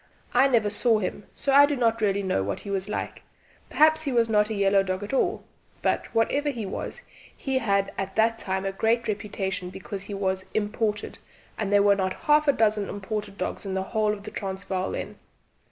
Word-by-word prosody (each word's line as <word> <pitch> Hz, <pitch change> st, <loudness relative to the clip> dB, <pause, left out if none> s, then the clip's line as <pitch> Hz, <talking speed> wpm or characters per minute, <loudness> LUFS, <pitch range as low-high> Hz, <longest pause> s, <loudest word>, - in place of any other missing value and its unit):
I 275 Hz, -, +5 dB
never 225 Hz, -6 st, +2 dB
saw 225 Hz, +1 st, +3 dB
him, 205 Hz, 0 st, -4 dB
so 275 Hz, -, -1 dB
I 285 Hz, +1 st, +8 dB
do 290 Hz, -, -1 dB
not 230 Hz, -3 st, +1 dB
really 200 Hz, -1 st, +1 dB
know 185 Hz, -, 0 dB
what 100 Hz, +1 st, -3 dB
he 200 Hz, -, -6 dB
was 195 Hz, +1 st, -1 dB
like -, -, -4 dB, 0.5 s
perhaps 315 Hz, +1 st, +4 dB
he 290 Hz, -3 st, -2 dB
was 235 Hz, -2 st, +2 dB
not 210 Hz, 0 st, +3 dB
a 220 Hz, -, -2 dB
yellow 200 Hz, 0 st, +4 dB
dog 185 Hz, 0 st, -3 dB
at 205 Hz, -, -6 dB
all; 360 Hz, +9 st, +1 dB, 0.4 s
but, -, -, +1 dB
whatever 285 Hz, +6 st, +1 dB
he 235 Hz, -6 st, -4 dB
was, 485 Hz, -, -5 dB, 0.3 s
he 265 Hz, -1 st, -1 dB
had 200 Hz, -4 st, +1 dB
at 195 Hz, 0 st, -4 dB
that 225 Hz, +1 st, +2 dB
time 190 Hz, -1 st, -2 dB
a 195 Hz, -, 0 dB
great 225 Hz, +4 st, +1 dB
reputation 195 Hz, -3 st, -3 dB
because 190 Hz, +1 st, -7 dB
he 200 Hz, -, -5 dB
was 190 Hz, -1 st, -1 dB
'imported,' 210 Hz, 0 st, -1 dB, 0.4 s
and 205 Hz, -2 st, -3 dB
there 205 Hz, 0 st, +5 dB
were 200 Hz, 0 st, +5 dB
not 185 Hz, -1 st, -1 dB
half 300 Hz, 0 st, +4 dB
a -, -, +7 dB
dozen 210 Hz, -3 st, +1 dB
imported 205 Hz, 0 st, -5 dB
dogs 185 Hz, -, -4 dB
in 195 Hz, -2 st, -4 dB
the 190 Hz, -, 0 dB
whole 215 Hz, -1 st, +2 dB
of 205 Hz, -1 st, -5 dB
the -, -, -8 dB
Transvaal 190 Hz, -1 st, -3 dB
then. -, -, -6 dB
210 Hz, 210 wpm, -26 LUFS, 195-230 Hz, 0.5 s, I